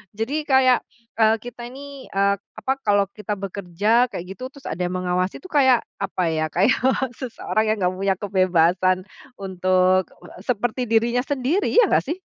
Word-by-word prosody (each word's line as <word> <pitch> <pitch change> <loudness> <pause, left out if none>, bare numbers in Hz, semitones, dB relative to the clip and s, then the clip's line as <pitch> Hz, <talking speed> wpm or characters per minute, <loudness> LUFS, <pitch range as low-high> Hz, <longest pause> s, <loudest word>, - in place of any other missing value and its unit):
Jadi 285 +8 -2
kayak, 260 -2 +5 0.4
eee, 220 0 +5
kita 240 0 -8
ini, 275 +2 -10
eee, 200 0 +1
apa, 215 +5 -5
kalau 200 -1 +3
kita 210 0 -5
bekerja, 200 +5 +1
kayak 175 - -5
gitu, 255 +1 -7
terus 280 - -9
ada 170 - -5
yang 180 - -3
mengawasi 180 +1 -1
itu 370 - -12
kayak 260 -5 +4 0.2
apa 190 -2 -2
ya, 155 -1 0
kayak 195 +8 +3 0.4
seseorang 230 -3 -2
yang - - -5
nggak 180 0 +1
punya 195 0 +1
kebebasan 185 -2 +2 0.4
untuk 185 -1 +2 0.4
seperti 245 +1 -1
dirinya 235 +2 +1
sendiri, 285 +8 0
iya 475 -4 +5
nggak, - - +2
sih? 330 +7 -4
215 Hz, 160 wpm, -22 LUFS, 185-255 Hz, 0.4 s, kayak